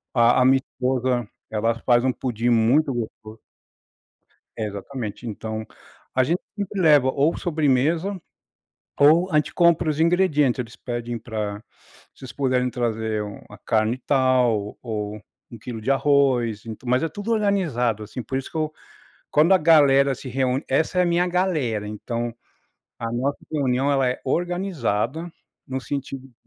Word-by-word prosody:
a 120 +1 +5
a 125 - +4
minha 135 +1 +6
esposa 125 -2 -1 0.2
ela 110 +1 0
faz 120 -1 +4
um 130 - +2
pudim 120 -2 -2
muito 120 +6 +3
gosto 110 -2 -7 1.2
É, 110 - -1
exatamente. 105 +3 -6
Então, 110 0 -5 0.5
a 130 - +4
gente 165 +7 0 0.2
sempre 200 -1 -3
leva 145 -5 +5
ou 145 +5 +1
sobremesa, 160 +4 +1 0.8
ou 160 +6 +5
a - - 0
gente 150 - +1
compra 170 -2 +3
os 150 - -5
ingredientes. 160 -6 +3
Eles 115 -3 -5
pedem 120 -1 -5
pra 105 -2 -4 0.6
"se - - -22
vocês 130 -4 -8
puderem 130 -1 +1
trazer 110 -3 -1
um 105 -1 -7
uma - - -14
carne 110 0 +1
e - - -12
tal, 125 -6 +2
o - - -15
ou 105 -2 -4 0.3
1 115 - -9
quilo 115 +1 -6
de 130 - 0
arroz", 130 -6 +2
ent 110 -2 -7
mas 125 +2 +1
é 165 - 0
tudo 205 +6 -5
organizado, 170 - +1
assim, 115 +4 -7
por 130 - -3
isso 135 - -8
que - - -6
eu 155 -1 -1 0.6
quando 155 +6 +5
a - - +7
galera 140 -5 +5
se 130 - -10
reúne 130 +1 0
essa 160 +6 +1
é - - +6
a - - +1
minha 175 +1 +2
galera, 155 - 0
então, 115 +2 -4 0.6
a 115 - -3
nossa 130 +4 -1 0.2
reunião 135 -2 +1
ela 135 -2 +2
é 125 - -3
organizada, 165 - -1 0.4
no 130 0 -3
sentido 135 -1 -5
de - - -26
130 Hz, 165 wpm, -23 LUFS, 115-155 Hz, 1.2 s, a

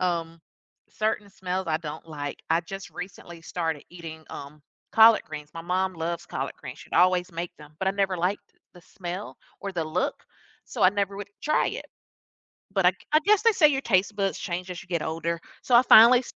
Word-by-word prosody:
Um, 165 -2 -1 0.5
certain 215 -1 -2
smells 185 0 -3
I 155 - +2
don't 155 0 -7
like. 145 -2 -5
I 165 +1 +4
just 190 +1 -8
recently 175 -1 -9
started 160 -3 -3
eating, 160 -2 -9
um, 145 +2 -9 0.3
collard 225 0 +7
greens. 150 -1 -8
My 165 - -6
mom 185 +1 0
loves 170 +1 -3
collard - - -4
greens. - - -8
She'd - - -15
always 180 0 +4
make 170 +1 -4
them, 150 0 -14
but 190 - 0
I - - +3
never 195 -2 0
liked 180 +4 -2 0.2
the 180 - -15
smell 180 +2 -7 0.2
or 200 - -5
the 170 -3 -2
look, 155 - -1 0.5
so - - -4
I 185 - +7
never 200 -1 -1
would, 200 0 -6
eh, - - -40
try 305 - +2
it. - - -6 0.9
But 195 -2 +1
I 180 - +7
g 185 - -24 0.2
I 305 - +7
guess 420 -1 +5
they 460 - +5
say 315 -6 +6
your 270 -2 0
taste 200 -3 +2
buds 195 -1 0
change 180 0 -4
as 175 - -6
you 195 - -16
get 170 -4 -1
older, 165 +1 -2 0.2
so 245 - +2
I 240 - +9
finally 240 +2 +8
180 Hz, 210 wpm, -26 LUFS, 165-200 Hz, 0.9 s, I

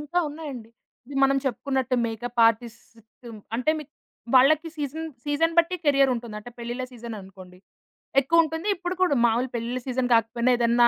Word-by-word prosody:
ఇంకా 315 +4 -2
ఉన్నాయండి. 285 -7 -8 0.4
ఇది 280 - -8
మనం 275 0 +3
చెప్పుకున్నట్టు 265 0 -1
మేకప్ 235 +1 -3
ఆర్టిస్ట్ 230 0 -1 0.7
అంటే 255 +5 +1
మీ 305 - -7 0.5
వాళ్ళకి 310 +5 +5
సీజన్ 310 +2 -4 0.2
సీజన్ 295 +3 +1
బట్టి 340 +2 +4
కెరియర్ 275 -2 +4
ఉంటుంది. 235 -2 -6
అంటే 210 +3 -10
పెళ్లిళ్ళ 240 +2 -4
సీజన్ 235 -1 -7
అనుకోండి 185 -1 -14 0.6
ఎక్కువుంటుంది, 320 +4 +1
ఇప్పుడు 360 0 -4
కూడా 355 -6 +3
మామూలు 235 +3 +1
పెళ్లిళ్ళ 240 +2 -2
సీజన్ 255 0 0
కాకపోయినా 235 +2 +2
ఏదైనా 235 0 +4
255 Hz, 150 wpm, -25 LUFS, 235-295 Hz, 0.7 s, వాళ్ళకి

